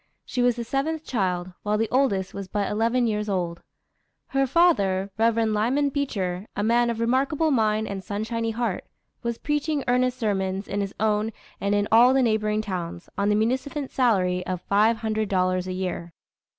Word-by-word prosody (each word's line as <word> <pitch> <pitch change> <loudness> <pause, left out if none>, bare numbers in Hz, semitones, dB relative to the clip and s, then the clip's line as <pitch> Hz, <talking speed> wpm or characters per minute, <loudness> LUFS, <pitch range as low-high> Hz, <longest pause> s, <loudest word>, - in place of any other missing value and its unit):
She 250 - -2
was 245 -1 +3
the 240 - -4
seventh 295 +6 -2
child, 185 -5 -1
while 210 0 0
the 225 +1 +1
oldest 240 -8 +1
was 195 -1 -6
but 200 0 -2
eleven 230 +4 +1
years 210 -1 -1
old. 175 -3 -2 0.7
Her 270 0 +1
father, 200 - +3
Rev. 230 0 +3
Lyman 245 +7 +1
Beecher, 205 -9 -2
a 205 - -1
man 235 +2 +3
of 230 -1 -2
remarkable 270 +7 +1
mind 220 -3 +2
and 195 -1 -5
sunshiny 225 +3 -2
heart, 225 -4 -2 0.4
was 235 -1 -2
preaching 295 -1 -1
earnest 250 +1 +2
sermons 195 -3 -1
in 205 +1 -2
his 195 0 -4
own 215 +1 +1 0.3
and 200 +1 +1
in 205 0 +1
all 245 +4 +6
the 265 - +4
neighboring 215 -2 +1
towns, 175 -4 -5
on 200 +1 +1
the 210 - +3
munificent 260 +6 -1
salary 185 -8 +2
of 185 -1 -3
five 215 +3 +3
hundred 220 -2 -2
dollars 185 -1 +1
a - - -3
year. 180 -2 -4
220 Hz, 175 wpm, -25 LUFS, 195-245 Hz, 0.7 s, all